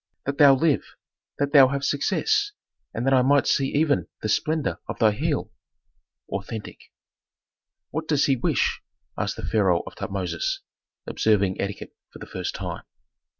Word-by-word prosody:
That 140 +2 -3
thou 140 -2 +8
live! 155 +1 0 0.4
That 140 +1 -1
thou 135 -3 +9
have 140 +1 -3
success, 410 - +1 0.4
and 115 - -4
that 135 - +3
I 130 - +5
might 140 +2 +3
see 135 - +2
even 145 0 +1 0.2
the 110 - -1
splendor 155 +7 0
of - - -5
thy 110 -1 +4
heel." 105 - -2 0.8
Authentic. 100 +3 -7 1.0
"What 160 0 -4
does 150 -3 +2
he 135 - +3
wish?" 120 - 0 0.3
asked - - -2
the - - -6
pharaoh 95 -5 +2
of - - -9
Tutmosis, 90 -4 -3 0.4
observing 100 -4 +1
etiquette 100 +1 -5 0.2
for - - -12
the - - -9
first - - -5
time. - - -5
135 Hz, 150 wpm, -24 LUFS, 105-145 Hz, 1.0 s, thou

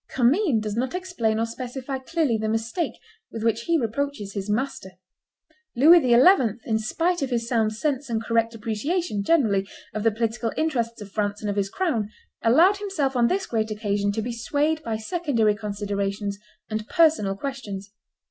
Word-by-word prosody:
Commynes 265 - +2
does 210 -1 -3
not 255 +8 -1
explain 350 -13 -1
or 225 - +1
specify 255 +3 -5
clearly 295 -2 0
the 220 0 -1
mistake 225 +10 -1 0.4
with 225 - -6
which 230 0 0
he 335 -1 +3
reproaches 235 -4 -3
his 200 0 -4
master. 210 -4 -2 0.8
Louis 325 +8 +7
XI., 250 - +5
in 220 -2 +1
spite 335 +11 0
of 275 - -1
his 235 -2 -1
sound 225 -3 +1
sense 280 +2 -2
and 225 -1 0
correct 230 0 0
appreciation, 225 - -2
generally, 200 -7 +2 0.2
of 215 - -3
the 225 - +4
political 230 +1 -1
interests 235 -8 -1
of 200 -1 -9
France 205 -1 -2
and 210 -1 -1
of - - -4
his 200 -1 0
crown, 235 - -1 0.3
allowed 335 - +5
himself 340 -10 -2
on 240 -1 +4
this 385 +5 0
great 220 -2 -1
occasion 205 -1 -1
to 220 +1 -2
be 240 - -3
swayed 290 +7 0
by 225 -6 -3
secondary 230 - +1
considerations 200 -1 -3 0.3
and 215 0 -4
personal 310 - +3
questions. 205 -7 -6
230 Hz, 170 wpm, -24 LUFS, 215-285 Hz, 0.8 s, Louis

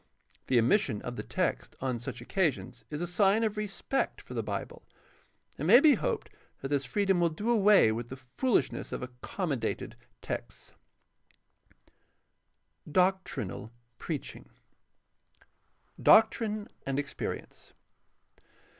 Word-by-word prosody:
The 130 - +3
omission 120 - +3
of 120 - -5
the - - -4
text - - -2
on 130 -2 -2
such 120 +1 -6
occasions 130 -5 -1
is 150 +1 -4
a - - 0
sign 195 +5 +3
of 215 -1 0
respect 210 +5 -2
for - - -11
the - - -1
Bible. - - -5 0.8
It - - -2
may 245 - +8
be 295 0 +7
hoped 230 - -2 0.3
that 135 - -4
this 140 -1 0
freedom 195 +6 +1
will 170 -1 +3
do 205 +9 -2
away 205 - +6
with 115 +2 -4
the 130 - -7
foolishness 135 - -1
of - - -4
accommodated 130 - -3 0.3
texts. - - -6 2.1
4. 150 - -12
DOCTRINAL 180 - 0 0.3
PREACHING 155 -5 -6 1.5
Doctrine 215 -1 +4 0.2
and 135 0 -2
experience. 140 -1 -5
160 Hz, 120 wpm, -30 LUFS, 125-205 Hz, 2.1 s, may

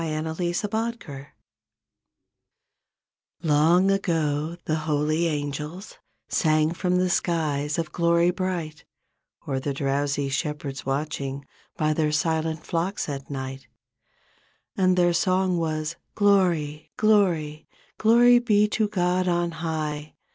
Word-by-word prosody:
43 160 +2 -2
CHRISTMAS 220 +5 -1
CAROL 140 -6 -9 2.2
Long 165 +5 +4
ago 160 -4 0
the 155 - -1 0.2
holy 155 +3 +1
angels 150 +5 -5 0.3
Sang 155 -2 +2
from 180 +1 0
the 185 0 +2
skies 155 -5 0
of 165 -2 -2
glory 170 0 +3
bright, 175 -5 -4 0.6
O'er 135 -1 -1
the 140 +1 -3
drowsy 140 0 0
shepherds 140 -1 -3
v/atching 140 0 -3 0.3
By 155 0 +1
their 155 -1 +1
silent 160 0 -1
flocks 175 +4 -2
at 140 -2 -6
night, 135 -2 -6 1.1
And 185 -1 +2
their 175 -1 +4
song 185 +1 +1
was 155 0 -2 0.2
''Glory, 175 -7 +2
glory. 175 -8 +2 0.3
Glory 240 +2 +6
be 210 -3 +3
to 215 0 +1
God 185 -2 0
on 175 -1 +1
high. 155 -2 -4
160 Hz, 110 wpm, -25 LUFS, 150-180 Hz, 2.2 s, Glory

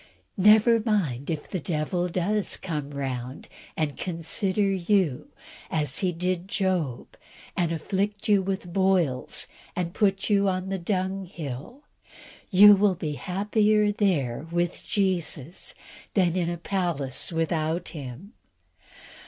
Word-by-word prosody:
Never 215 +4 +6
mind 180 - -1
if 155 -3 -3
the 185 - -3
devil 170 +3 -1
does 190 +4 0
come 150 -6 -4
round 130 -2 -5 0.3
and 155 -3 -1
"consider" 185 +4 -1
you, 190 -6 +1 0.4
as 150 -4 +1
he 185 -3 +1
did 180 +1 -2
Job, 185 - -1 0.4
and 170 -2 0
afflict 195 +5 -2
you 205 -2 +4
with 190 -2 -4
boils, 185 -9 +1 0.3
and 175 -1 -2
put 195 -2 +1
you 200 -1 +3
upon 185 0 -1
the 195 0 -2
dunghill 185 - -4 0.7
you 205 +1 +9
will 200 -1 +3
be 160 -4 -3
happier 210 +5 +1
there 160 - 0
with 175 +1 -1
Jesus 180 - -1 0.4
than 180 -4 +3
in 175 -2 0
a 175 - -3
palace 170 -8 0
without 165 +1 -1
Him. 150 - -9
180 Hz, 120 wpm, -26 LUFS, 160-195 Hz, 0.7 s, you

